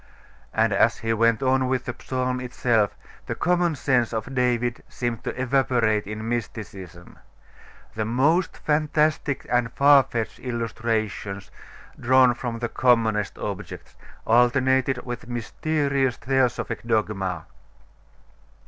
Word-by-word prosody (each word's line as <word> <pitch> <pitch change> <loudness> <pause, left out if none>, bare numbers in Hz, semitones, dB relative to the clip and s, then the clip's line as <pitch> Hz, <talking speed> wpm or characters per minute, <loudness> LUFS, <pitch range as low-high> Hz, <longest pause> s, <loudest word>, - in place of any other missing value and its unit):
And - - +2
as - - +3
he 115 0 -1
went 115 +2 +2
on 130 0 +2
with 130 -1 -1
the 120 - -3
psalm 130 -1 -1
itself, 120 -4 0 0.3
the - - -3
common 175 -2 +1
sense 130 -4 +1
of 110 +4 -4
David 120 -1 0
seemed 120 -2 -3
to - - -5
evaporate 120 -5 +1
in 110 +1 -5
mysticism. 100 -6 -6 0.7
The 110 - -2
most 145 - +1
fantastic 150 -1 0
and 120 -2 +1
far 140 0 +6
fetched 115 -3 -4
illustrations, 110 -4 -3 0.5
drawn 130 0 +5
from 120 -1 -5
the 120 0 -2
commonest 110 -5 +1
objects, - - -7 0.3
alternated 130 +2 +2
with 120 -2 -6
mysterious 135 +2 -1
theosophic 130 -1 0
dogma. 105 -5 -1
120 Hz, 115 wpm, -24 LUFS, 115-130 Hz, 0.7 s, far